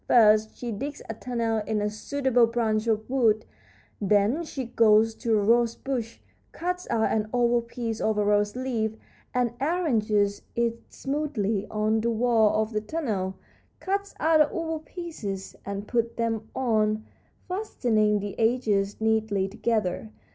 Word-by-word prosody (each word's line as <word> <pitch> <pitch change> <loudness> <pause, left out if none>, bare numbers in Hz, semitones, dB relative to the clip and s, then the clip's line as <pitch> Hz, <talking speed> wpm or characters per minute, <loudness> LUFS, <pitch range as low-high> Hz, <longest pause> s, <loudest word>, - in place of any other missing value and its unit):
First 215 -2 +5
she 240 -1 -4
digs 280 +7 -5
a - - -2
tunnel 230 -1 -1
in 215 -1 0
a 210 - 0
suitable 245 +2 +1
branch 225 -1 0
of 220 -1 0
wood; 230 -5 +2 0.6
then 210 - +2
she 285 -5 -5
goes 225 -1 +4
to 225 -1 0
a 205 - +1
rosebush, 235 +1 +1 0.3
cuts 360 +1 -3
out 220 -1 +1
an 215 -1 0
oval 240 -1 +3
piece 230 -1 -4
of 220 -1 +1
a 210 - +2
rose 205 +1 +2
leaf, 235 -4 -1 0.4
and 245 -2 0
arranges 220 - +1
it 235 0 0
smoothly 260 -8 -2
on 215 +1 +1
the 235 - 0
walls 225 -2 +3
of - - -13
the 215 - 0
tunnel; 210 - -2 0.4
cuts 400 +1 -2
other 310 -1 +4
oval 325 -1 -2
pieces 305 - -6
and 200 +1 -4
puts 235 -1 0
them 225 -1 -2
on, 215 -4 +1 0.4
fastening 230 - +1
the 205 0 -5
edges 220 -4 +1
neatly 220 -3 +1
together. 215 -1 -1
225 Hz, 145 wpm, -26 LUFS, 215-250 Hz, 0.6 s, First